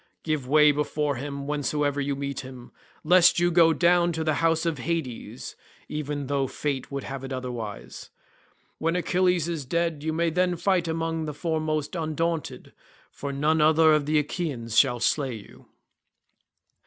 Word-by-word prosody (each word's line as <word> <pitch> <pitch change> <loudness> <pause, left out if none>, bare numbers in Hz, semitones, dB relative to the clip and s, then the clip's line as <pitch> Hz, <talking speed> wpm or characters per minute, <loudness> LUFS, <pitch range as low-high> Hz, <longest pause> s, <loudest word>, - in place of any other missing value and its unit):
Give 155 -5 -2
way 150 +1 +6
before 150 -1 -1
him 140 +1 -5
whensoever 145 0 -1
you 140 0 -1
meet 140 0 -4
him, 130 -2 -10 0.3
lest 175 +2 +5
you 175 0 +2
go 165 -1 +5
down 175 +1 +3
to 160 0 -2
the 155 -1 +1
house 165 0 +2
of 165 -5 -1
Hades 160 -5 -4 0.3
even 145 -1 -4
though 140 0 0
fate 135 -1 -3
would 140 0 -4
have 135 +1 -6
it 135 - -7
otherwise. 120 -5 -6 0.7
When 165 +2 0
Achilles 180 -1 +1
is 165 -4 -3
dead 165 +2 -1
you 160 +1 -2
may 165 +1 0
then 180 +1 +1
fight 175 0 +1
among 165 0 -2
the 150 -2 -5
foremost 155 -1 -2
undaunted, 165 0 -3 0.4
for 140 - -5
none 150 +3 +1
other 160 +1 +5
of 150 -2 +1
the 155 0 +2
Achaeans 145 -7 -3
shall 125 -3 +4
slay 130 +1 0
you." 105 -3 -14
150 Hz, 160 wpm, -26 LUFS, 140-165 Hz, 0.7 s, way